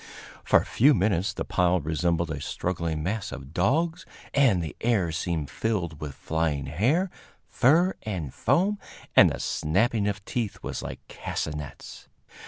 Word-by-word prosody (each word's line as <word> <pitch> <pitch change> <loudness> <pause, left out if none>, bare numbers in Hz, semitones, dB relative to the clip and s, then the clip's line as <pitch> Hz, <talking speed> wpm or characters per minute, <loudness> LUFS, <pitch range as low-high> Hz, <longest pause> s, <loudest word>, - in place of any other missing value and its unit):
For - - +5
a - - -5
few 140 +5 +4
minutes 95 -2 +1
the - - -4
pile 90 0 +2
resembled 85 +1 0
a 70 -2 -4
struggling 85 -1 -2
mass 100 +4 -2
of 70 +1 -9
dogs, 160 - +1 0.3
and 130 -10 +4
the 80 - -6
air 110 -8 +2
seemed 80 -2 -2
filled 85 -9 -2
with 75 -3 -5
flying 80 -3 -1
hair, 130 - +1 0.4
fur 165 +9 +4
and 90 - -4
foam, 200 +4 +1 0.4
and - - +8
the - - -4
snapping 100 +6 +1
of 105 0 -3
teeth 115 -5 -3
was - - -4
like - - -8
castanets. 75 -1 -6
90 Hz, 150 wpm, -26 LUFS, 80-115 Hz, 0.4 s, and